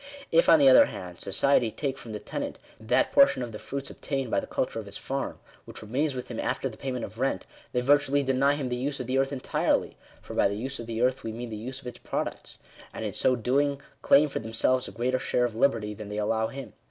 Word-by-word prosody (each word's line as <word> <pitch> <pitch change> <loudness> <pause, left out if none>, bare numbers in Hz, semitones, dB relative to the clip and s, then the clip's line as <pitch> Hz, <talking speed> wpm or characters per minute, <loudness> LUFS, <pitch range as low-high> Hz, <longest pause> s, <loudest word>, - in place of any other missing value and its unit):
If, 165 - +4
on 165 - +9
the 140 -3 +5
other 130 - +8
hand, 90 -1 -8
society 120 +4 +2
take 135 +4 -3
from 120 -4 -10
the 105 - -4
tenant - - -5 0.2
that 110 - +1
portion 275 - +5
of 120 - -6
the 105 - -7
fruits 140 0 -5
obtained 135 -4 -3
by - - +3
the - - -7
cul - - 0
ture - - -6
of - - -8
his - - -7
farm, - - -4 0.3
which - - -8
remains 135 +6 -1
with 125 0 -6
him 120 - -5
after - - -1
the 115 - -8
payment 125 -1 -4
of 110 +3 -12
rent, 130 -8 0 0.3
they 125 - 0
virtually 145 +1 +3
deny 135 +2 +2
him 140 -3 -3
the 125 - -1
use 140 +3 -3
of 125 - -3
the 130 +2 +1
earth 135 +1 +1
entirely 135 -2 0 0.2
(for - - -10
by - - +3
the 100 - -3
use 135 +5 -4
of 115 - -7
the 115 +1 -1
earth 130 +1 +1
we 115 - -3
mean 120 +2 -6
the - - -4
use 130 +5 -6
of - - -20
its 125 - -7
products), - - -4 0.3
and - - -5
in - - -3
so 130 - +2
doing, 140 +4 +1 0.2
claim 145 +2 +5
for 140 - -4
themselves 115 +3 +1
a - - -8
greater 125 +2 0
share 125 -1 +1
of 115 -2 -4
liberty 115 -4 +1
than 105 0 -8
they 105 - -4
allow 110 +1 +1
him. 135 +2 -8
125 Hz, 255 wpm, -27 LUFS, 115-135 Hz, 0.3 s, on